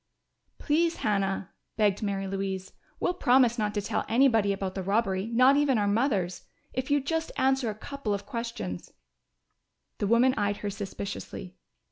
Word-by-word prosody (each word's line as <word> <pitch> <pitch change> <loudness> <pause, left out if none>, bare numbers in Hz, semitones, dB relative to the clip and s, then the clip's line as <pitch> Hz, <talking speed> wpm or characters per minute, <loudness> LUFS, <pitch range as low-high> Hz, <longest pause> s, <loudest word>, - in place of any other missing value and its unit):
"Please, 330 +2 +1
Hannah!" 195 -3 0 0.3
begged 205 -2 +2
Mary 200 -2 -2
Louise. 190 -1 -3 0.3
"We'll 360 - +1
promise 250 -7 +3
not 210 0 -1
to 205 - -1
tell - - -1
anybody 225 -4 +4
about 195 -1 -3
the 190 - -3
robbery 195 0 0
not 255 +4 +5
even 285 -4 +3
our 205 -1 +1
mothers. 200 -5 0 0.3
If 260 +2 -3
you'd 285 -1 +2
just 325 +1 -1
answer 265 -2 +2
a 210 - -4
couple 280 0 -5
of 200 - -7
questions 230 - -5 0.5
" - - -52
The 205 - 0
woman 240 +4 +4
eyed 205 0 0
her 205 - -1
suspiciously. 195 -2 -6
215 Hz, 160 wpm, -28 LUFS, 195-260 Hz, 0.5 s, not